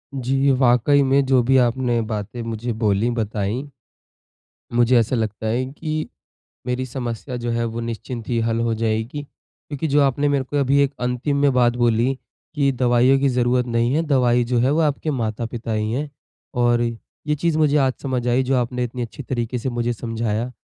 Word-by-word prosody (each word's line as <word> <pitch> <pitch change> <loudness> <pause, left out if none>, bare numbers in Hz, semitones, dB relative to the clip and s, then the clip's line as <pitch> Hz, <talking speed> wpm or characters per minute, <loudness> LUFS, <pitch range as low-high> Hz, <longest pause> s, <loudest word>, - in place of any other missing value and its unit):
जी, 135 +2 +1
वाक़ई 130 +2 +4
में 135 +1 +3
जो 130 -1 +4
भी 135 +2 +3
आपने 120 -1 +2
बातें 110 +1 -4
मुझे 115 +1 -4
बोलीं 110 0 +1
बताईं, 110 +3 -2 1.1
मुझे 120 +1 +4
ऐसा 115 +3 0
लगता 110 -1 -2
है 120 +4 0
कि 155 +1 -4 0.6
मेरी 125 +1 -2
समस्या 125 0 -5
जो 120 -1 -3
है 115 0 0
वो 115 0 -3
निश्चिंत 115 0 -6
ही 120 - 0
हल 115 0 0
हो 115 -1 0
जाएगी। 110 +5 -2
क्योंकि 145 +1 -8
जो 145 +1 +3
आपने 140 +1 +2
मेरे 140 -2 +1
को 145 - -5
अभी 140 +1 +2
एक 140 0 0
अंतिम 125 +3 -1
में 140 -1 +4
बात 120 -1 +3
बोली 120 +2 +2 0.4
कि 140 -2 +2
दवाइयों 125 +1 +3
की 140 - +3
ज़रूरत 125 0 +1
नहीं 120 +1 +1
है, 160 - +2
दवाई 125 -5 +2
जो 120 +1 0
है 125 +3 +3
वो 160 - +2
आपके 150 +2 -4
माता-पिता 115 -2 -3
ही 110 0 -1
हैं, 145 +4 -3 0.4
और 120 -1 +2
ये 120 +5 -4
चीज़ 160 +1 0
मुझे 150 -1 +3
आज 130 - +1
समझ 130 -3 -2
आई 125 +2 +3
जो 130 +1 +1
आपने 125 0 -1
इतनी 125 +1 -5
अच्छी 120 +5 -7
तरीक़े 125 -1 -3
से 120 - -3
मुझे 120 0 -1
समझाया। 115 +1 -3
125 Hz, 190 wpm, -21 LUFS, 115-135 Hz, 1.1 s, वाक़ई